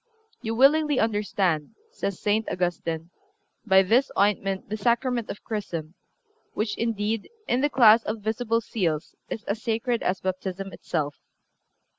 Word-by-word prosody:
(363) - - -7
"You 225 - -1
willingly 290 +3 +4
understand," 195 -7 0 0.2
says 200 - -3
St. 215 +1 +1
Augustine, 170 -2 -2 0.6
"by 190 -1 +6
this 235 +8 +3
ointment 195 -1 +1
the 215 - -3
Sacrament 235 +2 0
of 205 - -7
Chrism, 170 -7 -4 0.6
which, 215 0 -1
indeed, 220 -1 -1 0.2
in 245 +2 +2
the 290 - +3
class 230 -4 +7
of 215 - -2
visible 230 +2 0
seals 170 -9 -2 0.2
is 220 - -5
as 210 +3 -3
sacred 230 +1 0
as 185 +1 0
Baptism 190 +1 -4
itself." 150 -3 -3
210 Hz, 140 wpm, -26 LUFS, 190-230 Hz, 0.6 s, class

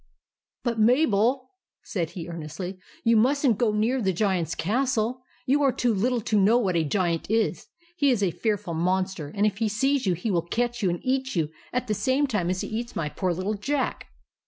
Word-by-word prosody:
"But, 235 -2 -1
Mabel," 250 +1 +3 0.3
said 170 -5 -2
he, 165 -1 -5
earnestly, 170 +3 -6 0.2
"you 230 0 +4
must 275 +6 +3
n't 230 -6 +3
go 235 -3 +3
near 225 +5 +1
the 190 -3 +2
Giant's 180 -4 0
castle. 250 +3 0 0.2
You 285 +3 +2
are 275 -2 +4
too 245 -2 +1
little 235 +4 +1
to 210 0 +1
know 215 +5 +5
what 195 -7 0
a 165 - +2
Giant 170 0 -1
is. 225 +1 0 0.3
He 285 -5 +3
is 235 -6 +2
a 185 - +2
fearful 205 -2 -2
monster, 180 -2 -1
and 205 +1 +2
if 205 -1 0
he 225 -2 +1
sees 265 +3 +1
you 180 - +2
he 190 +6 -2
will 175 -3 +2
catch 240 +8 -2
you 190 - +2
and 175 0 -2
eat 260 -1 -1
you 160 -3 0 0.2
at 250 +1 -1
the 215 - -1
same 260 +8 +1
time 205 -10 -1
as 185 0 -1
he - - -4
eats 235 +2 -4
my 150 -2 -1
poor 185 +3 -1
little 185 +5 -2
Jack." 265 +6 -2
215 Hz, 210 wpm, -26 LUFS, 185-250 Hz, 0.3 s, know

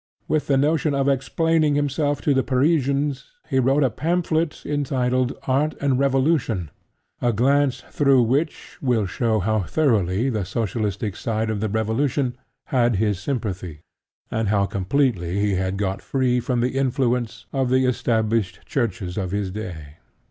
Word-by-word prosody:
With 155 -1 0
the 140 - +3
notion 150 +1 +2
of 140 0 +1
explaining 150 +3 +2
himself 145 0 0
to 145 - +3
the 135 - +3
Parisians 140 0 +1 0.2
he 135 -4 +1
wrote 135 +3 +3
a 130 - +2
pamphlet 165 - -1
entitled 130 -3 0
Art 145 +4 +1
and 135 -2 +1
Revolution, 135 - +1 0.5
a 120 - +2
glance 135 +4 +2
through 135 -4 +4
which 140 +7 -2
will 120 -6 +1
show 110 +3 0
how 110 +3 +1
thoroughly 110 - +1
the 105 -4 -1
socialistic 105 0 -2
side 110 -1 -2
of 105 - -2
the 110 +1 -1
revolution 120 +5 0 0.4
had 120 -3 +3
his 105 -1 0
sympathy, 95 - -4 0.5
and 110 -1 0
how 100 -1 +2
completely 100 -2 0
he 100 0 +1
had 95 +1 -1
got 95 -1 -2
free 130 -2 +1
from 125 0 -1
the 125 +2 -1
influence 125 -3 0
of 135 -2 0
the 130 +1 +3
established 115 -5 0
Churches 100 -7 -2
of 95 -2 -2
his 100 0 -2
day. 85 -8 -7
125 Hz, 150 wpm, -23 LUFS, 105-140 Hz, 0.5 s, through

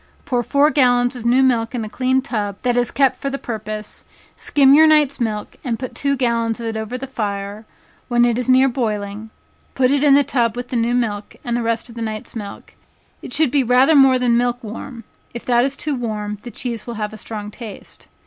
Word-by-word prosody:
Put 245 -3 -1
four 290 +2 +3
gallons 245 -3 +3
of 235 -1 -4
new 255 +3 +4
milk 235 -2 +1
in 230 -3 -2
a - - -6
clean 260 +3 0
tub 205 -6 -3
that 245 -1 +1
is 245 -1 +1
kept 265 -2 +2
for 275 - -3
the 275 - -3
purpose; 215 -3 -6 0.3
skim 275 -2 +4
your 315 +2 +7
night's 300 -3 +3
milk, 215 -3 -3
and 235 -4 -2
put 255 +1 -6
two 280 -1 -1
gallons 235 -2 0
of 235 - -5
it 225 -1 -3
over 220 +3 -4
the 260 - -6
fire; 205 -3 -5 0.4
when 240 -1 +3
it 240 0 +1
is 250 - -3
near 260 +1 +5
boiling, 215 -4 -3 0.5
put 255 -1 +3
it 285 0 +2
in 285 -2 +6
the 285 - +5
tub 240 -5 0
with 245 0 -6
the - - -4
new 235 +1 +1
milk, 210 -4 -2
and 240 -1 -1
the 240 - 0
rest 230 0 -1
of 235 - -11
the 230 - -7
night's 215 0 -5
milk; 205 -3 -8 0.5
it - - -9
should 295 -1 +2
be 285 - +3
rather 255 +5 +4
more 270 -3 +6
than 245 -2 +2
milk 245 0 0
warm, 230 +2 -8 0.3
if 235 - -7
it 240 -1 +4
is 275 +1 -2
too 300 - -2
warm 210 -4 -4
the 245 - -8
cheese 235 -2 -5
will 235 - -5
have 210 0 -4
a - - -7
strong 210 -1 -7
taste. 220 -3 -11
240 Hz, 230 wpm, -20 LUFS, 220-260 Hz, 0.5 s, your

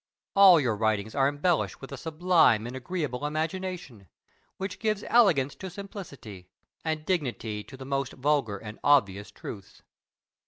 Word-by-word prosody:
All 195 -4 +8
your 120 -6 0
writings 110 0 0
are 135 -1 +3
embellished 150 +4 0
with 135 - -10
a - - -4
sublime 160 -7 +3
and 120 +2 -6
agreeable 145 -1 -4
imagination, 160 - -4 0.5
which 195 0 -5
gives 215 -2 -1
elegance 165 - +4
to 190 - -8
simplicity, 155 - -10 0.3
and 155 -1 -2
dignity 120 - -2
to 135 - -12
the 130 - -9
most 135 -1 -2
vulgar 135 -6 0
and 105 +2 -10
obvious 105 -8 +3
truths. 100 -1 -10
140 Hz, 145 wpm, -27 LUFS, 115-180 Hz, 0.5 s, All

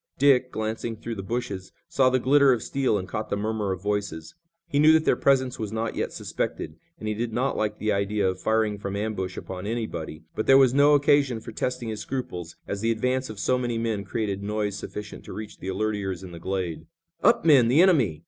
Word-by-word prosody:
Dick, 130 -2 +4
glancing 110 +1 -3
through 115 +2 -6
the 100 - -5
bushes, 95 -3 -4 0.2
saw 130 -2 +3
the 130 - +2
glitter 140 +2 +5
of 120 -3 +1
steel 135 -6 0
and 95 -2 -5
caught 110 - -4
the 100 - -1
murmur 105 -1 -1
of 95 0 -4
voices. 100 -6 -3 0.3
He 145 -4 0
knew 155 +1 +7
that 160 0 +3
their - - +4
presence 130 -2 +2
was 110 -2 -3
not 110 0 -2
yet - - -2
suspected, - - -4 0.2
and 110 - -6
he 105 - 0
did 115 +2 -3
not 130 +4 0
like 105 -1 -1
the 110 0 0
idea 100 0 +1
of 95 0 -2
firing 110 -2 +1
from 100 -1 -4
ambush 100 -3 -3
upon 95 +1 -6
anybody, 95 -9 -4
but 110 - -3
there 135 - +8
was 130 -2 +5
no 145 +2 +6
occasion 145 -4 +3
for - - -9
testing 125 -2 -3
his 110 -1 -4
scruples, 90 -11 -5
as 100 0 -3
the 115 - +1
advance 125 +3 0
of 110 - -8
so 125 +5 +1
many 120 -2 -2
men 115 -3 -1
created 100 -2 -3
noise 105 0 -2
sufficient 105 0 -7
to - - -8
reach 105 0 -8
the 95 - -7
alert 110 +3 -1
ears 95 -3 -4
in 90 - -9
the 85 - -9
glade. 85 -3 -3 0.3
"Up, 230 -4 +4
men! 140 -7 +6
The 140 +9 +5
enemy!" 130 - +3
110 Hz, 225 wpm, -26 LUFS, 100-125 Hz, 0.3 s, there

